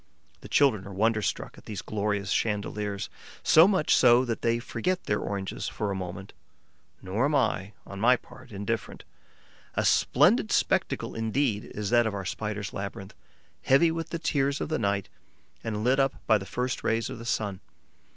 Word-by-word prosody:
The - - -12
children 115 -9 +3
are - - -8
wonderstruck 110 +2 -1
at - - -20
those 105 -4 -5
glorious 100 -2 -2
chandeliers, 105 -2 -1 0.4
so 160 +3 +7
much 185 -6 +2
so 120 +2 +6
that 115 -2 -3
they 115 0 +2
forget 180 +9 -2
their 105 - 0
oranges 100 -2 -4
for 105 -1 -3
a - - -2
moment. 95 +1 -6 0.7
Nor 100 +7 0
am 145 +1 +1
I, 105 -6 0
on 100 - -8
my 125 +4 +5
part, 125 +1 -14
indifferent. 100 +1 -4 0.7
A - - +1
splendid - - +4
spectacle - - 0
indeed 115 -1 0
is 105 0 -5
that 120 -1 +4
of 105 - -3
our 95 -2 -4
Spider's 105 0 -4
labyrinth, 100 0 -6 0.5
heavy 160 +5 +4
with 165 0 -4
the 170 - -3
tears 140 -3 0
of - - -3
the 155 - 0
night 100 -2 0 0.6
and 105 -1 -3
lit 130 +3 +3
up 135 -1 +2
by 110 - +4
the 95 - -8
first 125 0 -2
rays 115 0 0
of - - -7
the - - -8
sun. 105 -4 -2
110 Hz, 175 wpm, -27 LUFS, 100-125 Hz, 0.7 s, so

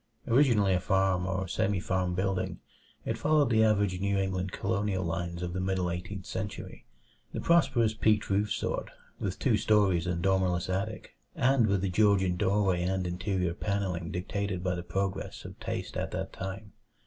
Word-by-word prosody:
Originally 115 -6 +4
a 90 - +2
farm 95 -1 +1
or 95 0 -2
semi 95 +2 0
farm 90 -1 -1
building, 95 0 -1 0.5
it - - -2
followed 150 -3 +3
the 110 -1 +5
average 100 -4 +2
New 100 +1 0
England 95 -1 -1
colonial 100 -1 -1
lines 85 +1 -3
of 85 0 -3
the 95 - -2
middle 95 -1 0
Eighteenth 90 +2 -5
Century 100 +2 -6 0.5
the - - -3
prosperous 120 -10 +3
peaked 110 -1 +2
roof 100 +1 +1
sort, - - -2 0.3
with - - -3
two - - +2
stories 95 -5 +3
and 85 -1 -1
dormerless 95 -2 +1
attic, 100 +4 -3 0.2
and 130 -3 +3
with 100 -2 +1
the 100 - 0
Georgian 95 -2 +3
doorway 95 -1 +2
and 95 +1 0
interior 90 0 -1
panelling 95 -3 -2
dictated 95 +1 -3
by 90 -1 0
the 90 - -3
progress 95 +2 -3
of - - -10
taste - - -4
at - - -2
that - - -4
time. 95 +2 -6
95 Hz, 170 wpm, -29 LUFS, 90-105 Hz, 0.5 s, the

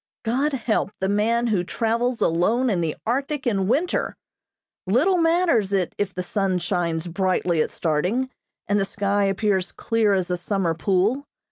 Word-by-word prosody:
God 265 +6 0
help 230 -6 0
the 190 - 0
man 220 +4 +1
who 210 -6 +1
travels 230 +5 -1
alone 220 +10 +2
in 180 -4 0
the 160 -2 -1
Arctic 275 +5 -1
in 195 -6 +1
winter! 295 - 0 0.7
Little 315 - +3
matters 330 - +2
it 190 -3 0
if 205 -1 0
the 180 - -2
sun 190 0 0
shines 175 -2 -1
brightly 180 -2 0
at - - 0
starting, 180 +12 -1 0.4
and 205 +1 +2
the - - +2
sky 200 0 0
appears 195 -1 0
clear 225 -3 +1
as 185 -2 0
a 180 - 0
summer 175 -1 -1
pool. 195 - +1
205 Hz, 160 wpm, -23 LUFS, 180-240 Hz, 0.7 s, Little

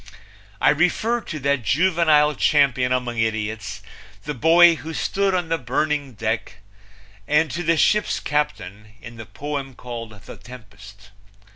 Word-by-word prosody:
I - - +4
refer 195 +10 0
to 155 - -7
that 140 -1 0
juvenile 155 +1 +3
champion 140 -5 +2
among 125 -2 -2
idiots, 105 -2 -3 0.4
the 150 - -4
boy 165 +5 +5
who 160 +1 -8
stood 195 -1 0
on 175 -3 -2
the 165 0 0
burning 140 +2 -2
deck, 110 -2 -3 0.7
and 150 -1 +2
to 170 - -4
the 165 -1 +1
ship's 210 +5 +2
captain 105 -9 -4
in 115 +1 -12
the 110 - -9
poem 140 -2 -6
called 115 -5 -9
The - - -11
Tempest. 100 -5 -14
140 Hz, 140 wpm, -22 LUFS, 110-160 Hz, 0.7 s, boy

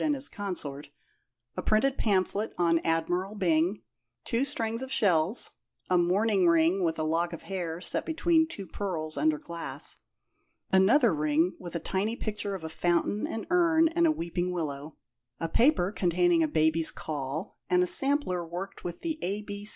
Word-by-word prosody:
and 300 -2 +2
his 270 0 -1
consort; 150 -9 -5 0.7
a - - -3
printed 240 +5 +2
pamphlet 205 -1 0
on 170 -1 +3
Admiral 175 +5 -1
Byng; 175 +1 +1 0.4
two 235 +1 0
strings 230 -3 -1
of 265 0 -5
shells; 185 -2 +2 0.4
a 180 - +5
mourning 190 +2 +2
ring 170 +3 +3
with 160 -1 0
a 155 - -1
lock 165 +2 0
of 170 - -8
hair 175 -4 -4
set - - -2
between 325 0 +2
two 205 - -7
pearls 165 -4 -4
under 310 0 +2
glass; 170 - -6 0.7
another 210 - +5
ring 155 +3 +1
with 175 -1 -8
a - - 0
tiny 205 +7 -2
picture 210 -3 -3
of 185 - -8
a - - -3
fountain 175 +5 0
and 225 - -5
urn, 330 -2 +4
and 340 +1 +2
a - - +4
weeping 175 - -2
willow; 150 -3 -4 0.4
a 165 - -1
paper 230 - +3
containing 175 -3 +2
a 160 - +3
baby's 160 +1 +3
caul 150 +4 -5
and 180 0 +4
a - - +2
sampler 270 -5 0
worked 175 +4 -7
with 175 -1 -6
the 320 -2 -3
A. 205 +3 -3
180 Hz, 165 wpm, -28 LUFS, 165-220 Hz, 0.7 s, a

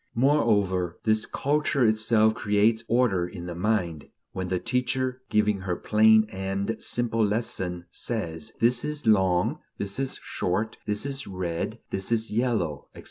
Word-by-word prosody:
Moreover, 100 - +2
this 110 0 +2
culture 140 -2 +1
itself 110 0 +3
creates 110 +2 +2
order 110 -8 +2
in 90 -2 -8
the 90 - -5
mind: 85 -5 -1 0.2
when 95 -1 -4
the 90 0 0
teacher, 125 +3 -1
giving 105 -1 +2
her 95 -2 -2
plain 110 +2 +5
and 95 +3 -2
simple 115 -2 0
lesson, 95 -5 -1
says: 110 -3 -4
This 120 +2 +2
is 150 -2 -4
long, 95 -5 +3 0.2
this 100 +4 -4
is 135 -1 -3
short, 105 +5 -2
this 105 +4 -1
is 140 -2 -3
red, 90 -3 -3
this 95 +3 -3
is 115 -1 0
yellow, 110 - -1
etc. - - -10
110 Hz, 145 wpm, -26 LUFS, 95-115 Hz, 0.2 s, plain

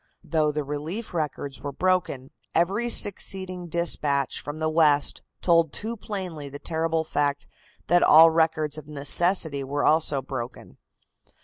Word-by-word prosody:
Though 155 -2 0
the 150 0 -3
relief 155 +11 -6
records 145 -4 -4
were 145 +1 -5
broken, 175 -6 -1 0.2
every 200 +8 +1
succeeding 185 -4 +1
dispatch 155 -5 +1
from 145 +2 -7
the 155 0 -2
West 155 -3 +2 0.2
told 165 -3 +3
too 225 +2 -3
plainly 185 -9 -6
the 140 - -8
terrible 160 +1 -2
fact 145 -2 -1 0.4
that 175 +1 +3
all 165 +1 +7
records 160 -2 0
of 150 - -14
necessity 150 +1 +2
were 145 +2 -2
also 155 -3 +3
broken. 120 - -8
155 Hz, 135 wpm, -25 LUFS, 145-175 Hz, 0.4 s, all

